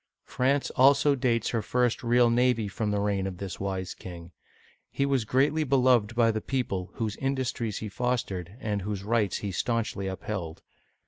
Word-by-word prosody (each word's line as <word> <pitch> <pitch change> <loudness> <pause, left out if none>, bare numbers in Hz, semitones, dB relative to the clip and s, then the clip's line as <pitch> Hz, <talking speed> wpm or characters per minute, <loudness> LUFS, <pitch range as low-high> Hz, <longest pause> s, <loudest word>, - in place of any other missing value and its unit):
France 135 +2 0
also 140 +2 +5
dates 120 -4 +1
her 115 - 0
first 125 +2 0
real 120 0 +4
navy 120 -2 +2
from 105 +2 -2
the 105 0 0
reign 100 -2 0
of 95 -2 -6
this 95 -1 -6
wise 95 -2 -3
king. 85 -1 -10 0.6
He 140 - 0
was 135 -5 +1
greatly 145 +6 +2
beloved 125 -5 +3
by 115 -1 +4
the 110 0 -3
people, 105 -9 -2
whose 110 -2 -3
industries 130 -5 -2
he 110 - -4
fos 125 +3 0
tered, 90 +2 -7
and 105 -6 -2
whose 100 0 -4
rights 105 -2 +1
he 100 - -2
stanchly 110 -1 -1
upheld. 95 -3 -5
115 Hz, 175 wpm, -27 LUFS, 100-125 Hz, 0.6 s, also